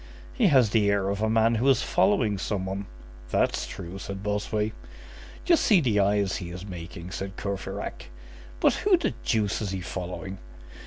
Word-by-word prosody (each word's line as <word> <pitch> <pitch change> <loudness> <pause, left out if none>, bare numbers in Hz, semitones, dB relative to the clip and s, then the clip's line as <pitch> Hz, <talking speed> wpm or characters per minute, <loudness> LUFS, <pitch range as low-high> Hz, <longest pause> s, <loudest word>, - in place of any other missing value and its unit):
"He 245 -7 +3
has 130 - +5
the 105 -3 +3
air 100 -1 +1
of 100 +1 -2
a 110 - +2
man 115 +1 +3
who 120 +4 +2
is 135 - +4
following 130 - +2
some 100 -1 -2
one." 95 +1 -4 0.4
"That's - - +1
true," 90 +3 -7
said 100 0 -6
Bossuet. 105 +1 -1 0.7
"Just 340 -2 +4
see 205 -5 +5
the 115 -9 +2
eyes 100 -1 +2
he 85 - -6
is 90 +2 -7
making!" 85 -1 -8
said 95 -1 -5
Courfeyrac. 100 0 -5 0.5
"But - - +4
who 400 -3 +5
the - - -1
deuce 105 -2 0
is 105 - -2
he 95 -1 -3
following?" 95 +2 -5
100 Hz, 175 wpm, -27 LUFS, 95-110 Hz, 0.7 s, has